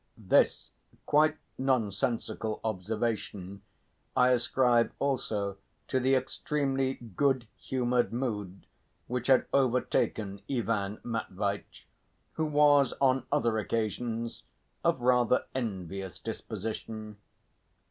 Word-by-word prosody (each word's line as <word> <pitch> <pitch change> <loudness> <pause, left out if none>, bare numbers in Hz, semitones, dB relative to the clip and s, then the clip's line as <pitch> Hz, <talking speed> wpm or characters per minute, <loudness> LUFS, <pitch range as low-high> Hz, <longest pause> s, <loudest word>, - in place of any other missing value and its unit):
This - - +2 0.3
quite 155 +1 +4 0.2
nonsensical 115 -3 0
observation 105 -2 -3 0.6
I 125 0 +6
ascribe 125 -1 +3
also 105 -8 -1 0.3
to 130 - +2
the 130 +1 +3
extremely 135 0 0
good 120 +2 0
humoured 125 -1 0
mood 105 -6 -3 0.4
which 125 0 -3
had 130 -2 +5
overtaken 115 -6 +1
Ivan 110 -5 -1
Matveitch, 100 -3 -3 0.5
who 160 - 0
was 145 -3 +5
on 130 -2 +3
other 115 -6 +2
occasions 115 +2 -2 0.4
of - - +2
rather 125 0 +3
envious 95 -6 -4
disposition. 110 -1 -5
120 Hz, 90 wpm, -30 LUFS, 105-130 Hz, 0.6 s, I